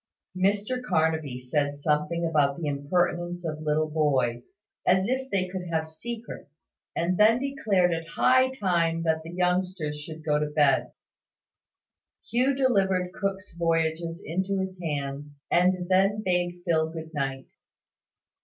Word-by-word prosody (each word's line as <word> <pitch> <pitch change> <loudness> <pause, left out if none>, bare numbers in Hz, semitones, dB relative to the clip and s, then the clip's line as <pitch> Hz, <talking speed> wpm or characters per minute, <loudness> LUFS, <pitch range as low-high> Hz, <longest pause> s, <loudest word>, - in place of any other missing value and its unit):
Mr 205 +7 +1
Carnaby 160 - 0
said 145 +3 -1
something 150 +3 0
about 145 -4 +2
the 170 - -4
impertinence 175 +4 -1
of 155 -1 -4
little 155 0 +1
boys, 135 -6 0 0.3
as 190 +2 +3
if 260 +2 -1
they 190 -4 0
could 180 -1 -5
have 160 -1 0
secrets, 160 - -9 0.2
and 180 +3 0
then 220 +2 +6
declared 225 -10 +1
it 165 0 -4
high 260 +9 +4
time 170 -9 0
that 160 -1 +1
the 160 - -9
youngsters 180 -4 -1
should 155 0 -9
go 150 -1 +2
to 150 - 0
bed. 145 -3 +2 1.4
Hugh 255 +5 +2
delivered 190 -9 +1
Cook's 195 -1 -3
Voyages 165 0 -1
into 190 +4 -1
his 190 -1 -4
hands, 145 -3 -3 0.2
and 180 0 +3
then 195 +3 +2
bade 175 -1 0
Phil 160 -2 +2
good 160 0 -8
night. 135 -2 -3
170 Hz, 135 wpm, -27 LUFS, 155-190 Hz, 1.4 s, then